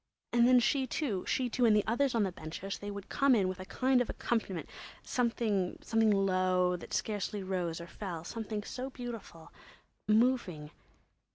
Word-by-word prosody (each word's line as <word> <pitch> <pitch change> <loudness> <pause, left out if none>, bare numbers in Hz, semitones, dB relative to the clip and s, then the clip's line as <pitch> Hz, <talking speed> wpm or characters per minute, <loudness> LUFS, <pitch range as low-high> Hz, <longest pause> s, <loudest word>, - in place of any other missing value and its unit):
And 240 0 +5
then 250 0 +7
she 265 +2 +1
too, 230 - -2
she 255 - +1
too, 245 +1 -1
and 220 -2 +6
the 210 - +3
others 250 +3 +1
on 225 - +3
the 190 - 0
benches—they 190 +5 -6
would 200 -1 -7
come 275 -2 +3
in 195 -4 +2
with 185 0 -4
a 185 - -6
kind 255 +4 +2
of 245 - -2
accompaniment—something 225 +1 -1
low, 185 -2 +2
that 175 - -9
scarcely 205 -1 -2
rose 180 -3 -2
or 170 - -7
fell, 175 -2 -6
something 215 +2 -4
so 255 +4 -5
beautiful—moving.... 220 - -2
210 Hz, 155 wpm, -32 LUFS, 185-240 Hz, -, then